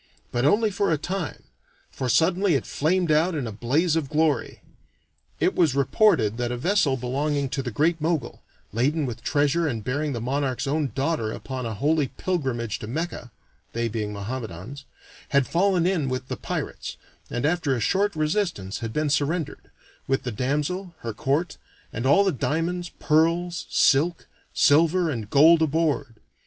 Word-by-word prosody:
But 120 +2 0
only 210 +8 +3
for 200 +1 0
a 160 - +2
time, 175 +1 -4 0.5
for 130 - -3
suddenly 175 +5 +3
it 135 - -1
flamed 175 +2 +1
out 160 +3 +3
in 140 -5 -2
a 115 - -4
blaze 145 - +1
of 155 -5 -1
glory. 155 -2 0 0.8
It 185 - +2
was 160 -7 +2
reported 140 - +3
that 120 0 -1
a 125 - -2
vessel 150 -2 +2
belonging 140 +3 -1
to 135 - -2
the 125 - -4
Great 155 +8 +1
Mogul, 155 -6 -1 0.3
laden 145 +7 +1
with 120 -2 -5
treasure 145 +3 +1
and 115 -7 -3
bearing 145 +5 -1
the 120 - -3
monarch's 130 +2 -1
own 145 -1 0
daughter 135 -5 0
upon 130 0 -5
a 110 - -4
holy 145 +4 +1
pilgrimage 130 - -2
to 110 - -7
Mecca 150 -1 -4 0.4
(they 115 0 -1
being 110 -2 -3
Mohammedans), 110 +4 -6 0.4
had 140 -2 +3
fallen 180 +1 +2
in 175 -7 +1
with 130 0 -4
the - - -2
pirates, - - -5 0.3
and 120 +3 -2
after 155 -4 +1
a - - -2
short 195 - +1
resistance 155 - -1
had 115 -1 -4
been 150 -1 0
surrendered, 150 +1 -1 0.4
with 135 0 0
the 125 - -3
damsel, 150 - -2
her 115 -1 -4
court, 140 +10 -1 0.4
and 115 +4 -2
all 195 +9 +6
the 195 - +2
diamonds, 170 +6 -2
pearls, 165 +2 +1
silk, 165 +5 +3 0.3
silver, 165 +3 +3
and 110 -6 -5
gold 160 +5 +6
aboard. 155 -6 0
145 Hz, 165 wpm, -25 LUFS, 125-165 Hz, 0.8 s, all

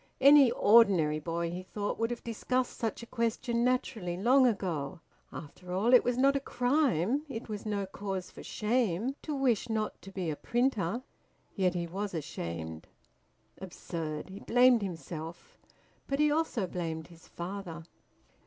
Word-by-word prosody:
Any 280 -1 +8
ordinary 190 -9 +5
boy 170 +1 -2
(he 180 +1 -5
thought) 205 +2 -4
would 230 0 +1
have 240 -1 -5
discussed 250 +2 -1
such 230 0 -3
a - - -7
question 235 0 -1
naturally 220 -8 -1
long 255 +6 +5
ago. 175 - -2 0.3
After 180 +4 -9
all, 215 +7 +2
it 250 - +8
was 245 0 0
not 275 +2 +4
a - - +2
crime, 255 - +1
it 230 -2 -6
was 215 -1 -5
no 200 -2 -1
cause 190 -1 -5
for - - -11
shame, 225 0 0
to 300 - -4
wish 245 -4 +1
not 215 -1 -2
to 195 - -11
be 185 -4 -2
a - - -3
printer. 240 - 0 0.5
Yet 185 -3 +1
he 175 -1 -1
was 195 +3 -4
ashamed! 85 - -5 0.7
Absurd! 165 -4 -5
He 195 - -8
blamed 245 -1 +5
himself. 165 -2 -7 0.5
But 275 - -1
he 300 0 +3
also 300 -9 0
blamed 165 -3 -4
his 165 -1 -16
father. 175 -2 -6
205 Hz, 155 wpm, -30 LUFS, 170-245 Hz, 0.7 s, Any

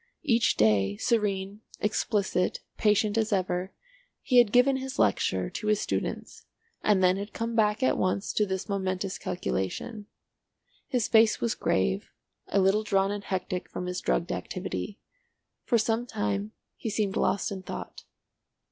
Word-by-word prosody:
Each 235 -6 +3
day, 100 -2 +3
serene, 205 - 0 0.2
explicit, 205 -3 0
patient 210 0 +2
as 220 0 0
ever, 185 -1 0 0.5
he 250 -2 +5
had 235 -4 +5
given 250 +3 +5
his 265 0 -5
lecture 95 -3 +2
to 215 - -5
his 215 -1 +3
students, - - -4 0.3
and 200 -3 +3
then 185 +1 +4
had 205 +2 -6
come 230 0 -3
back 215 +1 +2
at - - +2
once 185 +2 0
to 210 - +2
this 190 -1 -3
momentous 190 -1 -2
calculation. 190 - -3 0.8
His 245 -4 0
face 225 -1 +5
was 235 - 0
grave, 140 - 0 0.4
a 200 - +1
little 195 +2 +3
drawn 195 -2 +1
and 205 0 -4
hectic 185 -1 -3
from 180 - -5
his 180 +1 -3
drugged 175 - 0
activity. 195 +2 -4 0.7
For 240 - +3
some 225 +2 0
time 105 - -2 0.2
he 225 - -4
seemed 205 -2 -1
lost 200 - +1
in 195 -1 -5
thought. - - -7
200 Hz, 150 wpm, -28 LUFS, 185-220 Hz, 0.8 s, he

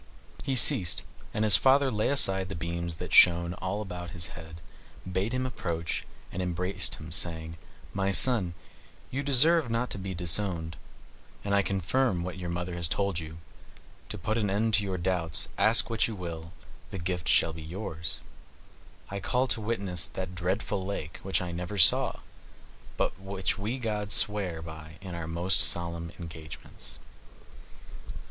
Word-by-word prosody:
He 135 - -2
ceased; 90 -7 +6 0.3
and 105 - -1
his 105 -3 +10
father, 135 0 +3
laying 110 +5 0
aside 95 -8 +4
the 95 - -5
beams 85 +1 -4
that - - -7
shone 85 0 +6
all 95 +4 -4
around 90 -2 -7
his 85 0 +1
head, 80 +1 -11 0.5
bade 95 +4 -2
him 130 0 -1
approach, 85 -9 -4 0.2
and 95 - -4
embracing 90 +1 0
him, 80 0 -10
said, 80 -1 -1 0.4
"My 100 0 -1
son, 100 -4 +4 0.6
you 135 - -2
deserve 145 +2 +4
not 115 +2 -2
to - - -3
be 95 0 -5
disowned, 85 -1 -1 0.7
and 100 - -2
I 100 - +4
confirm 95 +1 0
what 90 +1 -6
your 90 -1 -5
mother 90 +1 -4
has 85 -1 -1
told 100 0 -1
you. 80 -1 -9 0.7
To 105 - -5
put 110 +5 -2
an 105 -3 0
end 110 +3 0
to 105 - +5
your 95 -2 -3
doubts, 85 -3 -2
ask 110 +2 +4
what 115 -2 0
you 110 - -6
will, 85 -3 -7 0.4
the - - -6
gift 90 -2 -4
shall 80 - +3
be 80 - -9
yours. 85 -1 -6 0.9
I 100 - -4
call 125 +6 0
to 115 - 0
witness 100 -6 0
that 95 -1 -6
dreadful 95 +2 -2
lake, 95 -5 -6
which 95 -1 -1
I 90 - -5
never 90 +4 -5
saw, 90 - +4 0.8
but - - -1
which 95 0 -3
we 110 +6 -3
gods 105 -4 -2
swear 95 -6 +2
by 80 -1 -10
in 95 -2 -8
our 85 -2 -5
most 85 +3 +2
solemn 85 -1 +2
engagements." 80 -2 -10
95 Hz, 165 wpm, -28 LUFS, 85-105 Hz, 0.9 s, his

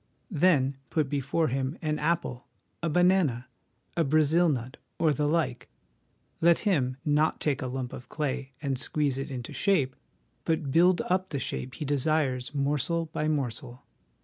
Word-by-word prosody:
Then 145 -6 +3
put 155 -4 0
before 145 +3 0
him 135 +4 -2
an 155 -2 -1
apple, 160 -8 -1 0.3
a 170 - 0
banana, 170 -7 +3 0.5
a 170 - +2
Brazil 155 +3 +3
nut, 130 -3 -3 0.2
or 155 -2 +3
the 145 +2 0
like; 150 -6 -1 0.7
let 170 0 +6
him, 130 -9 +1
not 150 +1 +2
take 145 -4 0
a 130 - -2
lump 125 -1 -4
of 125 - -9
clay 140 -3 -3
and 135 -3 -1
squeeze 145 -2 0
it 135 - -4
into 125 -3 -6
shape, 150 -11 +1 0.5
but 160 -4 -1
build 175 +4 +5
up 185 +1 0
the 140 - -3
shape 130 -1 -4
he 150 - -5
desires 140 -2 0
morsel 150 +4 0
by 155 - -1
morsel. 125 -4 -3
145 Hz, 155 wpm, -28 LUFS, 130-160 Hz, 0.7 s, let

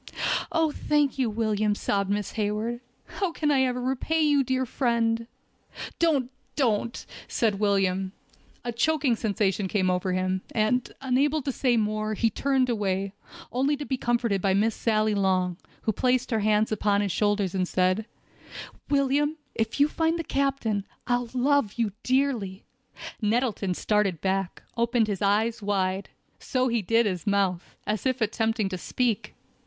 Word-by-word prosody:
"Oh! 325 -2 +2
thank 295 -2 +1
you, 250 -3 +2
William," 215 -1 0
sobbed 200 -1 -1
Miss 205 -1 -1
Hayward. 215 +2 -2 0.3
"How 385 -4 -2
can 300 -2 0
I 270 -2 +4
ever 250 -1 +1
repay 265 +6 0
you, 290 -2 +4
dear 260 0 0
friend?" 230 -2 0 0.7
"Don't—don't!" 260 -6 0 0.2
said 215 -4 0
William. 195 -2 +1 0.5
A 240 - -1
choking 270 +1 +2
sensation 205 -3 0
came 185 -1 +1
over 180 0 0
him, 185 0 0
and, 235 +3 +1
unable 275 +3 +1
to 275 - -1
say 250 -2 +1
more, 215 0 0
he 225 +2 +1
turned 265 +2 +1
away, 200 -4 -1 0.4
only 275 +4 +1
to 290 - -5
be 265 - -1
comforted 235 -5 0
by 190 0 +2
Miss 215 +3 +2
Sally 215 -1 +1
Long, 185 -3 +1 0.3
who 220 - +2
placed 255 +3 +1
her 225 - +2
hands 215 +1 +2
upon 205 -1 +2
his 200 -2 -1
shoulders, 205 -1 +1
and 185 -1 0
said: 185 +5 +1 0.8
"William, 290 +2 +2 0.2
if 225 +4 -2
you 285 - +7
will 300 - -5
find 325 0 +1
the 330 - -2
captain, 275 -9 0 0.2
I'll 245 -1 0
love 255 -4 +2
you 230 -3 0
dearly!" 255 -8 0 0.6
Nettleton 215 -4 0
started 210 -5 +1
back, 190 -1 -2
opened 235 0 +2
his 205 -3 -3
eyes 215 +3 +2
wide—so 200 +6 -2
he 235 -1 +1
did 230 +4 +3
his 185 0 -2
mouth, 195 -3 0
as 215 +4 -1
if 260 0 0
attempting 220 -1 0
to 185 -2 -4
speak. 235 +2 -1
225 Hz, 155 wpm, -26 LUFS, 200-260 Hz, 0.8 s, you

